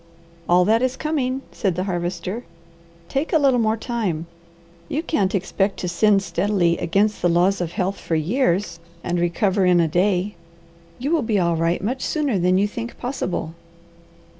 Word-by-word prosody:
"All 180 +1 +5
that 225 +3 +3
is 255 0 0
coming," 270 -4 -1
said 195 -6 -1
the 180 - -1
Harvester. 180 +4 -3 0.6
"Take 275 +4 -2
a 330 - +5
little 270 -4 +3
more 220 -1 +1
time. 210 -9 -2 0.6
You 305 +3 -1
can't 205 - 0
expect 195 +1 0
to 180 - -3
sin 200 +3 +3
steadily 175 -1 0
against 205 +5 +1
the 175 - +3
laws 180 +3 +2
of 170 -1 -3
health 195 -1 -2
for 165 - -2
years, 175 - 0 0.2
and 175 0 -1
recover 190 +3 +1
in 180 -1 +4
a 165 - +3
day. 185 +4 +1 0.6
You 275 +5 -2
will 330 -2 +3
be 220 -4 0
all 170 -2 +2
right 165 +2 0
much 255 +6 -2
sooner 285 - 0
than 180 +1 +3
you 200 +2 +2
think 235 +3 -6
possible." 215 - -3
195 Hz, 170 wpm, -22 LUFS, 175-235 Hz, 0.6 s, All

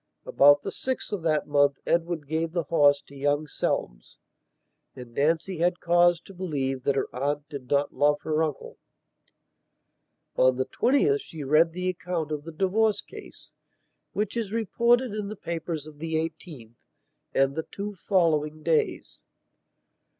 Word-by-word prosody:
About 145 +1 +5
the - - -4
6th 260 0 -4
of 205 -4 -2
that 155 -2 +1
month 145 -1 +3
Edward 170 -3 0
gave 160 +2 -2
the 170 -2 0
horse 145 -2 +4
to 140 - -15
young 145 +2 0
Selmes, - - -3 0.8
and 125 -2 -11
Nancy 160 +6 0
had 175 +1 +1
cause 175 0 +4
to 195 - -14
believe 140 -8 -3
that 140 - +2
her - - 0
aunt 145 +3 -2
did 140 -5 -8
not 145 0 +1
love 145 +2 +2
her 155 0 0
uncle. 155 -3 -4 1.6
On 130 0 +4
the 130 +1 -1
20th 395 - +2
she 160 - -8
read 155 +4 +4
the 180 +1 -3
account 170 -3 -3
of 150 -1 -4
the 165 - -7
divorce 200 +5 +1
case, - - -13 0.6
which 210 +3 -2
is 225 -4 -2
reported 235 +2 +2
in 210 -1 -3
the 215 - -6
papers 165 -4 -5
of 150 -1 -13
the 160 0 -3
18th 155 - -5 0.6
and 135 0 +3
the 160 - -4
two 205 +1 -5
following 155 -5 0
days. 160 -2 -1
160 Hz, 155 wpm, -26 LUFS, 145-180 Hz, 1.6 s, About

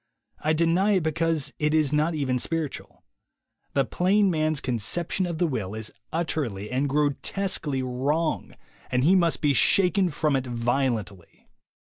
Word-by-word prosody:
I 155 - +1
deny 170 +6 +2
it 185 -4 +2
because 160 -2 0
it 150 +1 +1
is 150 -2 +2
not 155 +2 +1
even 130 -4 0
spiritual. 160 +1 -4 0.7
The 135 -1 +2
plain 195 - +2
man's 155 -2 0
conception 160 - -1
of 170 -2 -4
the 175 - +2
will 110 - -3
is 110 0 -4 0.2
utterly 130 - -2
and 135 +3 0
grotesquely 145 0 0
wrong, 140 +6 -1 0.3
and 125 0 +1
he 175 +6 +5
must 170 -3 +2
be 145 -1 +4
shaken 185 - +3
from 150 -2 0
it 130 -1 -1
violently. 120 -6 -3
150 Hz, 145 wpm, -25 LUFS, 130-165 Hz, 0.7 s, he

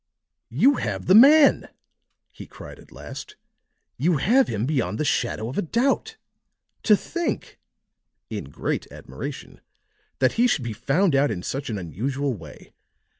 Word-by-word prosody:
"You 275 0 +3
have 100 -4 -3
the 185 - +4
man!" 280 +7 +6 0.6
he - - -12
cried - - -12
at - - -18
last. 420 - -10 0.6
"You 165 +1 +1
have 245 - +3
him 110 +1 -2
beyond 130 -7 -1
the 155 - 0
shadow 115 -5 -1
of 130 - -4
a - - +2
doubt! 270 - -1 0.6
To 210 - +4
think," 345 - -4 0.7
in - - -6
great - - -4
admiration, - - -9 0.6
"that - - +2
he 250 - +5
should 155 - 0
be 115 -2 -4
found 145 - +1
out 140 +1 +3
in 90 -4 -4
such 135 0 -4
an 110 - -3
unusual 130 - -3
way. 80 -8 -13
145 Hz, 150 wpm, -23 LUFS, -, 0.7 s, man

